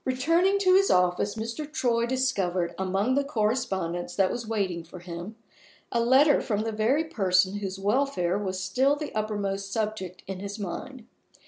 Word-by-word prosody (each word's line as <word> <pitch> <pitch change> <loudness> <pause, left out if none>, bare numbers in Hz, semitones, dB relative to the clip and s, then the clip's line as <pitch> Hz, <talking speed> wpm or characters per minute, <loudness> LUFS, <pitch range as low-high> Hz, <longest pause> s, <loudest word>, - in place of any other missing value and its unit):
RETURNING 330 +10 +2
to 370 -2 +5
his 390 +1 +5
office, 180 +3 +2
Mr. 230 +7 -5
Troy 235 -5 +1
discovered, 195 -10 0
among 195 +6 0
the 280 +1 +2
correspondence 210 - -1
that 190 -2 +2
was 235 -2 -5
waiting 190 -6 -1
for 170 +2 -12
him, 175 +4 -8 0.6
a 235 - +1
letter 265 +5 +5
from 210 -4 -1
the 225 +1 -2
very 225 +8 +1
person 195 - +1
whose 195 -1 -4
welfare 205 -3 0
was 190 -2 -3
still 255 +10 +2
the 295 0 -6
uppermost 200 -2 -2
subject 210 -4 -3
in 190 -1 -6
his 200 +2 -6
mind. 225 +5 -6
215 Hz, 160 wpm, -27 LUFS, 190-260 Hz, 0.6 s, to